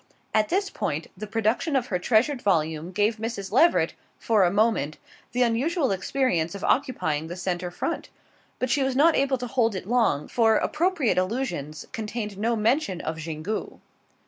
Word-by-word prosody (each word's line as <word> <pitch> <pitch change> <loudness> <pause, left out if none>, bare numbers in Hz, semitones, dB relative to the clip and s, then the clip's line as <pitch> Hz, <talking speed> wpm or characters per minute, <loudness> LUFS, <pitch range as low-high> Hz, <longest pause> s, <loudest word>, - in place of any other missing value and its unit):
At 215 -1 +2
this 390 +2 0
point 150 +3 -2
the 210 +3 -7
production 225 +8 0
of 255 -3 +2
her 180 - +2
treasured 245 +7 +2
volume 160 -3 0
gave 210 +4 +1
Mrs. 220 -3 -4
Leveret, 320 +10 +4 0.2
for 220 -4 +2
a 175 - +4
moment, 205 -7 +1 0.3
the 250 +1 +2
unusual 265 - +1
experience 190 -4 0
of 200 - -7
occupying 160 - 0
the 175 - -6
centre 180 -1 -2
front; 330 - -4 0.5
but 255 -1 -1
she 290 - +2
was 265 -1 0
not 315 +4 +5
able 275 -1 +2
to 250 - -5
hold 230 -3 +1
it 185 - -5
long, 225 -11 +2
for 225 -2 +3
Appropriate 310 - +1
Allusions 185 - -3
contained 215 -3 -4
no 230 +2 +1
mention 220 - +1
of 160 -1 -4
Xingu. 160 +6 -4
220 Hz, 170 wpm, -25 LUFS, 180-255 Hz, 0.5 s, not